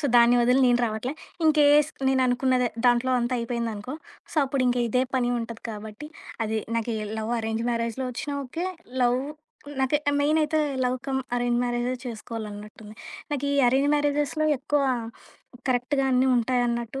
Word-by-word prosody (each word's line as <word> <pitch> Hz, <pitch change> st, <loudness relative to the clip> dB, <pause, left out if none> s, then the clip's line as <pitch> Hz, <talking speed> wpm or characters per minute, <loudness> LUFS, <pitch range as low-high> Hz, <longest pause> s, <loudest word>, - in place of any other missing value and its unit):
So -, -, -5 dB
దాన్ని 240 Hz, +1 st, +6 dB
ఒదిలి 250 Hz, +3 st, +4 dB
నేను 245 Hz, 0 st, +3 dB
రావట్లే. 220 Hz, +5 st, -3 dB, 0.3 s
ఇన్‌కేస్ 300 Hz, -1 st, +5 dB, 0.2 s
నేనునుకున్నదే, 255 Hz, -1 st, +2 dB, 0.2 s
దాంట్లో 245 Hz, +1 st, +3 dB
అంతా 240 Hz, +1 st, -1 dB
అయిపోయిందనుకో, 235 Hz, 0 st, -3 dB, 0.4 s
సో -, -, -11 dB
అప్పుడింకిదే 250 Hz, -2 st, +1 dB
పని 245 Hz, -1 st, +1 dB
ఉంటది 230 Hz, -1 st, -7 dB
కాబట్టి, 215 Hz, +6 st, -8 dB, 0.4 s
అది 220 Hz, 0 st, -1 dB, 0.2 s
నాకు 230 Hz, 0 st, -1 dB, 0.2 s
లవ్, 220 Hz, +2 st, -2 dB
అరేంజ్ 225 Hz, +1 st, -2 dB
మ్యారేజ్‌లో 235 Hz, +2 st, -2 dB
ఒచ్చినా 285 Hz, +4 st, -4 dB
ఓకే. 335 Hz, +8 st, -4 dB, 0.4 s
లవ్ 245 Hz, +1 st, +3 dB, 0.6 s
నాకు 265 Hz, +3 st, +2 dB, 0.2 s
మెయినయితే 305 Hz, +1 st, +2 dB, 0.3 s
లవ్‌ 250 Hz, -, +1 dB
క‌మ్ 265 Hz, -1 st, 0 dB, 0.2 s
అరేంజ్ 240 Hz, 0 st, +1 dB
మ్యారేజే 240 Hz, +1 st, -1 dB
చేసుకోవాలన్నట్టుంది. 215 Hz, -2 st, -8 dB, 0.4 s
నాకీ 285 Hz, -1 st, -1 dB, 0.2 s
అరేంజ్ 270 Hz, +3 st, +3 dB
మ్యారేజెస్‌లో 295 Hz, +1 st, 0 dB
ఎక్కువ 290 Hz, +3 st, 0 dB, 0.9 s
కరెక్ట్‌గా 255 Hz, +2 st, +1 dB
అన్నీ 255 Hz, +1 st, +3 dB
ఉంటాయన్నట్టు 240 Hz, +1 st, 0 dB
245 Hz, 130 wpm, -25 LUFS, 235-270 Hz, 0.9 s, దాన్ని